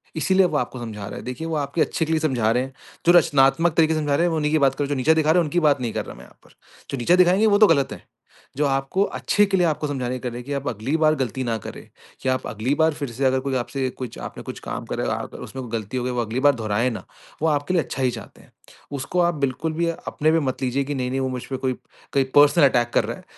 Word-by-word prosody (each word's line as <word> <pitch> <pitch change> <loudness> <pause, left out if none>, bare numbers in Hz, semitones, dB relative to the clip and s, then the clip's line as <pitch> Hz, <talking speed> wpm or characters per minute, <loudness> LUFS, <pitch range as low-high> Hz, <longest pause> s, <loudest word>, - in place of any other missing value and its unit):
इसीलिए 190 +4 +3
वो 155 -4 0
आपको 125 -1 -3
समझा 105 -4 -6
रहा - - -7
है। - - -7
देखिए 125 +6 -5
वो 165 - -2
आपके 145 +3 -1
अच्छे 160 - 0
के 160 - -4
लिए 160 - +2
समझा 125 -8 +1
रहे 125 +2 +1
हैं, 135 0 -8 0.3
जो 170 - +6
रचनात्मक 155 +2 +3
तरीके 160 -1 +4
से 155 - 0
समझा 145 -2 0
रहे 170 - +2
हैं - - +2
में 160 - 0
उन्ही 150 -1 0
की 155 - +3
बात 135 -2 +3
कर 145 - -1
रहा - - 0
हूँ, - - -7
जो 145 - 0
नीचा 145 +5 +4
दिखा 160 -1 +2
रहे 180 - +4
हैं - - +3
उनकी 170 +4 0
बात 145 -5 +2
नहीं 115 -3 -2
कर - - -3
रहा - - -9
मैं 60 - -13
यहाँ - - -21
पर। - - -21 0.4
जो 140 - -2
नीचा 125 +8 +3
दिखाएँगे 185 +4 +4
वो 205 -1 +4
तो 215 - +8
गलत 140 -6 +2
है। - - -12 0.5
जो 150 - +2
आपको 135 +7 +1
अच्छे 205 - +2
के 195 -1 +1
लिए 180 - +3
आपको 150 -1 -1
समझाने 130 -3 -3
कि - - -5
कर 125 - -3
रहे 120 - -7
हैं 120 - -10
कि 145 - -4
आप 140 0 -3
अगली 120 +6 -2
बार 155 -1 +3
गलती 130 -2 -2
ना 115 -2 -1
करें, 110 - -10 0.3
कि 130 - -1
आप 130 0 -1
अगली 110 +6 -1
बार 160 0 +3
फिर 145 -3 -5
से 130 +4 -2
अगर 130 0 +3
कोई 135 0 -3
आपसे 130 +2 -2
कुछ 125 -2 -8
आपने - - -8
कुछ - - -7
काम - - -4
करा - - -2
है - - -1
और - - 0
आ - - -7
उसमें 130 - -7
कोई 120 - -9
गलती 110 +4 -6
हो 125 - -1
गई 125 - -2
वो 125 -1 -1
अगली 115 +2 -3
बार 145 0 +4
दोहराए 110 +1 0
ना, 115 - -6 0.4
वो 160 - +2
आपके 145 +2 0
लिए 170 -4 +2
अच्छा 135 - -4
ही 125 - +2
चाहते - - -10
हैं। - - -22 0.4
उसको 140 +6 -2
आप 175 -1 +2
बिल्कुल 140 +3 -2
भी 170 +1 0
अपने 155 -1 -1
पे 165 - +3
मत 135 -4 -3
लीजिए 130 +2 0
कि 145 +1 -4
नहीं-नहीं 130 0 -2
वो 130 - -1
मुझपे 130 +1 -5
कोई 130 0 -1 0.4
कहीं 135 -1 +3
पर्सनल 145 +2 +6
अटैक 120 -2 +1
कर - - +3
रहा - - -5
है। - - -15
140 Hz, 310 wpm, -23 LUFS, 125-160 Hz, 0.5 s, तो